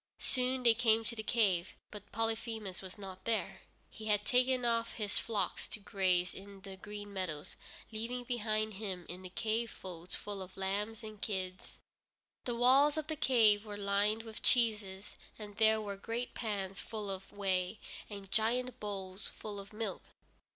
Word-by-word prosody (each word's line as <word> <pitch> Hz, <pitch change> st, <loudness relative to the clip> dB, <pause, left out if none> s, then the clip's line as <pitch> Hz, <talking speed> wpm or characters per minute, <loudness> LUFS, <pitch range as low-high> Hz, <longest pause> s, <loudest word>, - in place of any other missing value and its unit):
Soon 255 Hz, 0 st, +1 dB
they 235 Hz, -2 st, +8 dB
came 225 Hz, -1 st, +4 dB
to 235 Hz, +1 st, -3 dB
the 220 Hz, -, -2 dB
cave, 200 Hz, -6 st, +2 dB, 0.2 s
but 210 Hz, -, -9 dB
Polyphemus 225 Hz, -3 st, -1 dB
was 190 Hz, 0 st, -7 dB
not 190 Hz, -2 st, -8 dB
there. 230 Hz, -1 st, 0 dB, 0.3 s
He 220 Hz, -, -8 dB
had 210 Hz, -1 st, +2 dB
taken 250 Hz, 0 st, +3 dB
off 230 Hz, -1 st, +2 dB
his 210 Hz, -2 st, 0 dB
flocks 220 Hz, -3 st, -1 dB
to -, -, -5 dB
graze 185 Hz, -3 st, +2 dB
in 195 Hz, 0 st, -10 dB
the 195 Hz, -1 st, -8 dB
green 205 Hz, +1 st, -7 dB
meadows, 175 Hz, -6 st, -3 dB, 0.4 s
leaving 235 Hz, +3 st, -2 dB
behind 215 Hz, -3 st, 0 dB
him 190 Hz, -3 st, -4 dB
in 180 Hz, +1 st, -7 dB
the 185 Hz, -, -7 dB
cave 225 Hz, +4 st, 0 dB
folds 180 Hz, -3 st, -6 dB
full 205 Hz, -2 st, -5 dB
of 185 Hz, 0 st, -9 dB
lambs 205 Hz, +4 st, -1 dB
and 215 Hz, -1 st, -8 dB
kids. 185 Hz, -3 st, -3 dB, 0.7 s
The 240 Hz, -, 0 dB
walls 270 Hz, +5 st, +6 dB
of 310 Hz, -, 0 dB
the 315 Hz, 0 st, -2 dB
cave 225 Hz, -8 st, +5 dB
were 210 Hz, -2 st, -6 dB
lined 205 Hz, +2 st, +2 dB
with 225 Hz, -1 st, -8 dB
cheeses, 210 Hz, -5 st, +2 dB, 0.2 s
and 210 Hz, -1 st, -8 dB
there 220 Hz, -1 st, +6 dB
were 200 Hz, -2 st, -4 dB
great 230 Hz, +4 st, -3 dB
pans 195 Hz, -4 st, -2 dB
full 215 Hz, -3 st, -4 dB
of 195 Hz, 0 st, -5 dB
whey, 195 Hz, 0 st, 0 dB, 0.3 s
and 200 Hz, -2 st, -8 dB
giant 245 Hz, +3 st, +1 dB
bowls 195 Hz, -1 st, -4 dB
full 210 Hz, -2 st, -6 dB
of 200 Hz, 0 st, -9 dB
milk. 215 Hz, -2 st, -3 dB
210 Hz, 170 wpm, -35 LUFS, 195-230 Hz, 0.7 s, they